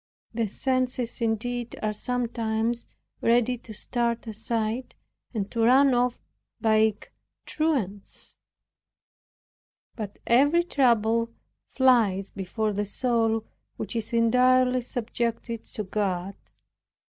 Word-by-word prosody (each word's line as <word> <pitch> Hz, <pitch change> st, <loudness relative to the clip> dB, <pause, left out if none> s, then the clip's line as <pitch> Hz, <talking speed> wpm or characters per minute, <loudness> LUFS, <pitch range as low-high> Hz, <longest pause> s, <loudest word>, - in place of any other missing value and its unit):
The 230 Hz, -1 st, 0 dB
senses 255 Hz, +1 st, -1 dB
indeed 235 Hz, +1 st, -2 dB
are 215 Hz, 0 st, 0 dB
sometimes 230 Hz, 0 st, -1 dB, 0.3 s
ready 240 Hz, +1 st, +3 dB
to 230 Hz, -, -12 dB
start 235 Hz, +2 st, -2 dB
aside, 225 Hz, +2 st, -2 dB, 0.4 s
and 205 Hz, -4 st, -3 dB
to 235 Hz, -, -4 dB
run 265 Hz, +3 st, +6 dB
off 245 Hz, 0 st, +1 dB, 0.4 s
like 220 Hz, -2 st, +2 dB, 0.3 s
truants; 240 Hz, -, -2 dB, 1.6 s
but 210 Hz, -3 st, -6 dB
every 290 Hz, +8 st, +4 dB
trouble 230 Hz, -7 st, +2 dB, 0.4 s
flies 225 Hz, -7 st, +3 dB
before 210 Hz, +2 st, -2 dB
the 205 Hz, +1 st, -1 dB
soul 225 Hz, 0 st, +1 dB, 0.3 s
which 210 Hz, -, -5 dB
is 225 Hz, -2 st, -3 dB
entirely 250 Hz, +2 st, +4 dB
subjected 235 Hz, -1 st, -3 dB
to 215 Hz, -, -5 dB
God. 190 Hz, -2 st, -2 dB
230 Hz, 100 wpm, -26 LUFS, 215-250 Hz, 1.6 s, run